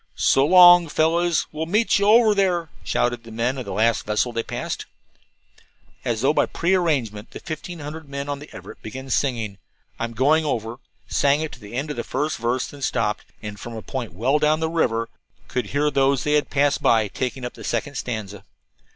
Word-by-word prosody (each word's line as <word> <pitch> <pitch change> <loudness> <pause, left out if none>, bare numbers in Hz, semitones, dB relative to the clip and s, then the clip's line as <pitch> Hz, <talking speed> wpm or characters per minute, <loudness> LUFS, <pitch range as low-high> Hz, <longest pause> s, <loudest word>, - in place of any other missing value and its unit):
"So 135 +1 +3
long, 175 -1 +8
fellows; 165 +2 +2
we'll 155 +1 -4
meet 210 +3 +2
you 200 - +2
over 220 0 +6
there," 180 -5 +1
shouted 120 -1 0
the 115 - -12
men 120 +4 -1
of 125 - -5
the - - -6
last 115 +1 +2
vessel 105 +3 0
they 115 - 0
passed. - - -5 1.2
As 115 -2 -1
though 135 +3 +3
by - - +2
prearrangement 150 - 0
the - - -9
fifteen 170 +2 -6
hundred 155 0 -8
men 140 0 -5
on 145 -1 -3
the 150 - -11
Everett - - -11
began 130 +4 -7
singing, 115 -8 -1 0.4
"I'm 115 0 -3
Going 150 +6 +3
Over," 115 -5 -2 0.3
sang 140 +1 +2
it 160 - -3
to - - -11
the 105 0 -12
end 145 +4 -2
of 150 - -6
the 120 - -2
first 150 +4 -2
verse, 120 +2 -1
then 145 - -11
stopped, 115 -5 -1 0.2
and 105 -1 -7
from 120 +2 -7
a 110 - -7
point 125 -7 -5
well 130 +9 +2
down 155 +1 +2
the 160 0 -1
river 115 -9 0 0.4
could 125 -4 -2
hear 145 +5 0
those 135 -1 +2
they 150 - +1
had 150 -1 +2
passed 140 0 +1 0.3
taking 130 0 -3
up 125 - -5
the - - -12
second 120 +5 -2
stanza. 105 -7 -5
140 Hz, 200 wpm, -23 LUFS, 115-155 Hz, 1.2 s, long